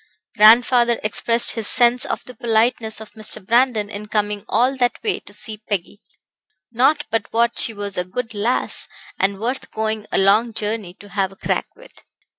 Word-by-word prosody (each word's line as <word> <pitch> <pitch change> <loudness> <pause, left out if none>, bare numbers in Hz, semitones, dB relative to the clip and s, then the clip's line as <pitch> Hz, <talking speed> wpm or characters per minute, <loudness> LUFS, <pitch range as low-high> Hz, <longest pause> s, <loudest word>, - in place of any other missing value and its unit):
Grandfather 235 +2 +5
expressed 230 +2 +2
his 225 -3 -2
sense 245 0 +4
of - - -4
the 250 - -8
politeness 225 -1 0
of 220 -1 -11
Mr. 215 -2 -3
Brandon 235 -2 +2
in 205 +1 -8
coming 210 -1 -2
all 255 +3 +2
that 245 -1 +1
way 425 -3 -1
to - - -15
see 215 +1 -5
Peggy. 205 +1 -3 0.7
Not 275 +6 +2
but 225 0 -2
what 235 +1 +1
she - - +3
was 205 -3 -4
a - - 0
good 225 +6 -5
lass, 215 +4 -1 0.3
and 195 0 0
worth 245 +5 -3
going 220 -1 -3
a - - 0
long 210 +4 +3
journey 210 -4 -4
to 205 - -15
have 195 -1 -1
a - - -15
crack - - -2
with. - - -18
220 Hz, 180 wpm, -20 LUFS, 205-240 Hz, 0.7 s, Grandfather